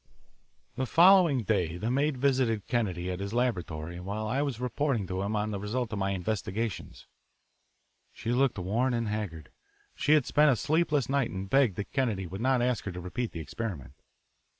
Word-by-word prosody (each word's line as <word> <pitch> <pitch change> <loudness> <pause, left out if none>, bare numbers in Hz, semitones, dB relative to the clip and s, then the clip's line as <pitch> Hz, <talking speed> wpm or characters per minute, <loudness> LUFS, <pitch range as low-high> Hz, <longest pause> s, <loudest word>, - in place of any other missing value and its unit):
The 130 - -1
following 170 -6 +6
day 90 -5 0
the 110 +6 -2
maid 140 +1 +1
visited 125 -5 +1
Kennedy 95 -7 -1
at 90 - -4
his 100 +3 -4
laboratory 85 -9 -2
while 100 +4 -4
I 130 +6 0
was 140 -6 -2
reporting 125 -2 -1
to 95 +1 -3
him 100 +2 -2
on 105 0 -1
the 100 - -3
result 110 +3 -3
of 105 - -2
my 95 0 0
investigations. 100 +2 -3 1.1
She 115 - -4
looked 130 0 +2
worn 115 +8 0
and 115 -2 -1
haggard. 85 -9 -5 0.4
She 150 - +2
had 150 -5 +4
spent 150 0 +4
a 130 - +4
sleepless 150 0 +1
night 135 -2 +1
and 95 +1 -5
begged 130 -3 +3
that 105 - -5
Kennedy 115 -9 0
would 95 +4 -7
not 130 -1 +2
ask 125 -2 0
her 100 - -3
to 90 - -6
repeat 110 +7 -4
the 85 - -6
experiment. 80 - -6
110 Hz, 185 wpm, -29 LUFS, 95-130 Hz, 1.1 s, following